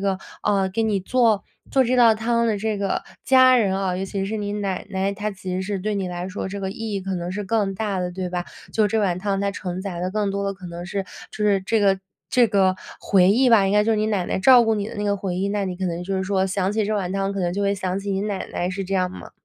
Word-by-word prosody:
个， 195 -1 0 0.2
呃， 200 -2 +2
给 200 +4 -1
你 215 -3 +1
做， 225 0 +2 0.3
做 265 -1 +4
这 250 - +1
道 235 -2 +7
汤 235 +1 +1
的 210 - 0
这 215 +1 -1
个 200 -1 -1 0.2
家 255 -1 +6
人 195 -5 +2
啊， 190 -2 -1
尤 190 - -2
其 195 0 -3
是 220 +2 -3
你 205 -1 -3
奶 200 -3 -2
奶， 195 0 0
她 210 +1 -3
其 185 -2 -6
实 185 - -1
是 200 0 -3
对 210 +3 -2
你 195 -2 -2
来 180 +1 -4
说 190 0 -4
这 200 - -5
个 190 -1 -3
意 225 0 -5
义 195 - -1
可 190 0 -3
能 175 0 -3
是 205 +2 -4
更 205 -1 0
大 200 -2 -1
的， 180 0 -2
对 180 0 -4
吧？ 175 0 -3 0.3
就 215 -2 +3
这 220 +2 0
碗 185 -4 +1
汤 195 -1 -1
它 200 0 0
承 180 -1 -5
载 190 -3 -5
的 180 +1 -2
更 210 0 0
多 200 0 -2
的 200 - -1
可 185 -2 -11
能 175 0 -7
是， 195 +1 -3 0.3
就 210 - -3
是 200 -2 +3
这 220 +4 0
个 195 -2 +3 0.3
这 245 -2 +4
个 195 -3 +3 0.3
回 185 -2 +4
忆 250 +5 +4
吧， 210 -4 +6
应 195 - +1
该 210 0 +5
就 225 - +2
是 - - +1
你 215 0 +1
奶 205 -4 0
奶 - - -1
照 245 +4 +7
顾 225 0 +2
你 205 -1 -2
的 - - -9
那 205 - -2
个 200 0 +1
回 190 -2 -3
忆。 195 +2 0
那 205 0 -1
你 185 -1 -4
可 190 - -3
能 170 0 -3
就 195 +1 -2
是 190 - 0
说， 190 0 +1
想 190 0 0
起 215 0 +1
这 215 - -1
碗 190 -3 -2
汤， 195 0 -1
可 200 - -3
能 175 -1 0
就 200 - -2
会 200 0 +2
想 190 -1 -2
起 200 0 -4
你 195 - -1
奶 205 -2 -3
奶， 175 - -1
是 195 +1 -4
这 195 - -3
样 185 -1 +1
吗？ - - -10
195 Hz, 320 characters per minute, -23 LUFS, 190-210 Hz, 0.3 s, 道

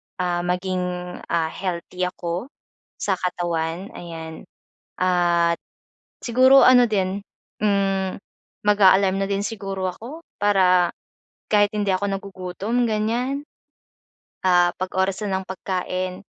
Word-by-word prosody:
ah, 175 -1 -1
maging 180 +1 -1 0.5
ah, 160 -1 0
healthy 180 0 -3
ako 175 +4 -4 0.5
sa 190 -3 -1
katawan 175 0 -2
ayan. 160 -2 -8 0.5
At 175 -2 +3 0.7
siguro 260 +3 +6
ano 250 -1 +7
din, 195 -1 -1 0.4
hmm, 195 -2 +1 0.5
mag-a-alarm 195 -1 +5
na - - -2
din 200 0 0
siguro 195 -4 -3
ako 250 - -9 0.2
para 185 -3 +4 0.6
kahit 205 -1 +4
hindi 205 -2 0
ako 200 +2 -2
nagugutom 195 +4 -2
ganyan, 235 +6 -1 1.1
ah, 175 -1 +5
'pag 185 - -2
oras 190 +2 +1
na 190 -2 0
ng 190 - -12
pagkain 185 0 -3
190 Hz, 110 wpm, -23 LUFS, 180-205 Hz, 1.1 s, ano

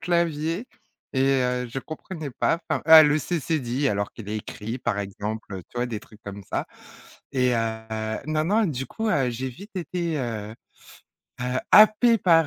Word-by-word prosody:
clavier 170 +3 0 0.5
et 130 - +2 0.2
heu, 125 -1 -1
je 135 - -4
comprenais 155 -1 -7
pas, 165 +6 0
enfin, - - 0
ah 160 -1 +11
le 150 +1 +4
c 170 +2 -2
cédille 140 -2 0
alors 100 -1 -1
qu'il 105 -3 -10
est 110 - -2
écrit 115 +3 -6
par 120 -4 -1
exemple, 105 +2 -5
heu, 95 - -6
tu - - -16
vois? 120 +1 0
Des 110 -3 -4
trucs 105 0 -18
comme 100 0 -7
ça. - - -1 0.7
Et 125 -2 +2
heu 110 -1 -2
non, 155 0 0
non, 210 +6 +3
du 135 -5 -3
coup, 220 0 -3
heu, 135 -9 +2
j'ai 130 +3 -3
vite 200 - -12
été, 175 -2 -2
heu 110 -3 -4 0.9
heu, 125 +1 -1
happée 215 +3 +7
par, 165 -4 +5
130 Hz, 185 wpm, -25 LUFS, 110-165 Hz, 0.9 s, ah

